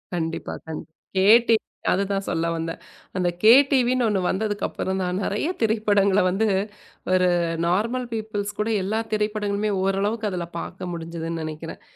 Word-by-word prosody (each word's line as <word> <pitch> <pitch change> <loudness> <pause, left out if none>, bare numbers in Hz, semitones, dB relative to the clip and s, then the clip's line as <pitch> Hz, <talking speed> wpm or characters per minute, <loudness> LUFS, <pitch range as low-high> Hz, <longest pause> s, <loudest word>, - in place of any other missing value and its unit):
கண்டிப்பா, 165 -1 -3
கண் 160 - -5 0.3
K 190 0 +3 0.2
TV 225 -1 +3 0.3
அது 195 +2 +2
தான் 195 0 -1
சொல்ல 165 -1 0
வந்தேன். 165 +1 -4 0.4
அந்தக் 175 -2 0
கேடிவினு 255 +1 +5
ஒண்ணு 205 -3 +1
வந்ததுக்கு 205 +1 -1
அப்புறம் 190 0 -3
தான், 180 0 -1
நறைய 210 - -1
திரைப்படங்கள 205 -3 +3
வந்து 195 +4 +1 0.6
ஒரு 185 0 +4 0.4
நார்மல் 230 +8 0
பீப்பல்ஸ் 210 -2 -3
கூட 210 +1 0
எல்லா 215 +4 -1
திரைப்படங்களுமே 210 -1 0
ஓரளவுக்கு 205 +3 0
அதுல 180 -2 -3
பார்க்க 180 +1 -6
முடிஞ்சதுன்னு 165 0 -5
நெனைக்கிறேன். 155 +1 -7
200 Hz, 140 wpm, -24 LUFS, 180-215 Hz, 0.6 s, கேடிவினு